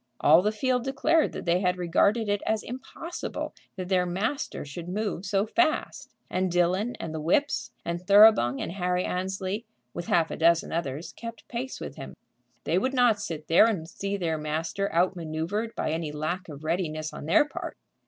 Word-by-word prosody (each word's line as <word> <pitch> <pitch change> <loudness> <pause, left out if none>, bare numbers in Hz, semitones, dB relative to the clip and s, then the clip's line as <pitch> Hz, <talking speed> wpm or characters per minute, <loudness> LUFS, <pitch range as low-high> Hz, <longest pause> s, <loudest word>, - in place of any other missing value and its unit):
All 160 +4 +6
the 210 +3 +1
field 250 +3 0
declared 300 +5 +2
that - - -6
they 170 +1 +3
had 180 -1 +1
regarded 200 +6 +2
it 205 0 0
as 220 -1 +1
impossible 265 +7 -6 0.2
that 185 -2 -5
their 180 -1 +2
master 215 - -2
should 165 +5 -7
move 200 -1 -2
so 200 0 +1
fast. 310 +7 0 0.2
And 185 0 -1
Dillon, 180 +7 +1
and 160 - -5
the 160 - -4
whips, 280 - +1 0.2
and 170 0 -2
Thoroughbung, 200 - +6
and - - -3
Harry 180 -1 0
Annesley, 190 +3 -2 0.3
with 175 - -5
half 165 -2 +2
a - - -3
dozen 170 0 +3
others, 160 -1 -3
kept 230 -1 -9
pace 250 +2 -5
with - - -7
him. - - -8 0.5
They - - +2
would 260 +1 -1
not 240 -5 +4
sit 155 -2 -5
there 170 +7 +6
and 185 -8 -2
see 200 +3 -3
their 165 -4 -1
master 160 +6 -2
outmanoeuvred 175 +5 -1
by - - -1
any 160 -1 -2
lack 165 +5 -3
of 145 0 -9
readiness 155 -2 -2
on 145 - -7
their 235 - +5
part. - - -6
185 Hz, 185 wpm, -27 LUFS, 165-215 Hz, 0.5 s, All